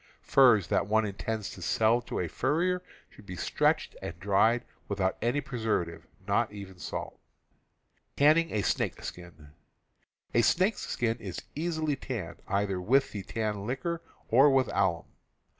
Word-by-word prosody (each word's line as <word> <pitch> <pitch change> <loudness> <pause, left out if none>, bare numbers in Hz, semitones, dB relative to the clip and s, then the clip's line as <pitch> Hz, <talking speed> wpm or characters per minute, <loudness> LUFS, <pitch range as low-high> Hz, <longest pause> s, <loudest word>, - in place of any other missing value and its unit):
Furs 120 -8 +5
that 100 - +1
one 110 +1 +3
intends 105 +1 -4
to 95 - -10
sell 110 +7 +2
to - - -4
a 90 - -1
furrier 170 - 0 0.3
should 105 - -17
be 90 - -6
stretched - - +1
and 85 0 -6
dried 105 +5 +3 0.2
without 95 -2 0
any 125 +5 +1
preservative, 105 - -2 0.2
not 110 +2 +1
even 100 -3 -10
salt. - - -6 1.0
A 155 -5 +4
snake's - - -1
skin 80 -4 -10 1.7
is 95 -4 -6
easily 155 -1 -1
tanned, 115 -10 -6
either 100 -2 0
with 130 +9 +3
the 100 - -5
tan 105 0 -3
liquor 170 +7 -2 0.3
or 135 +5 +6
with 135 -2 +3
alum. 95 -4 +1
110 Hz, 130 wpm, -29 LUFS, 95-135 Hz, 1.7 s, or